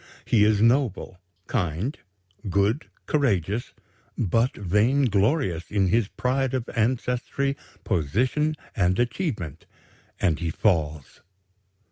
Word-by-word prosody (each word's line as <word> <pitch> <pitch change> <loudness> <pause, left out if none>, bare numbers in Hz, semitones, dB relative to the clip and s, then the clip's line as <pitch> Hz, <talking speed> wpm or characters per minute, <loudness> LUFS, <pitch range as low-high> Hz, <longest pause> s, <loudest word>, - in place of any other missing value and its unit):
He 110 -3 +4
is 105 0 +3
noble, 115 -7 +1 0.3
kind, 95 - -1 0.5
good, 100 - +1 0.2
courageous, 110 - 0 0.4
but 115 +6 +1
vainglorious 105 - +1
in 100 -3 +1
his 115 +1 +2
pride 130 +3 -1
of 125 -2 -2
ancestry, 125 +4 0 0.3
position, 125 - 0 0.2
and 90 -1 +2
achievement; 120 - -2 0.5
and 85 -5 +1
he 85 - -2
falls. 80 -6 -1
110 Hz, 95 wpm, -25 LUFS, 90-130 Hz, 0.5 s, He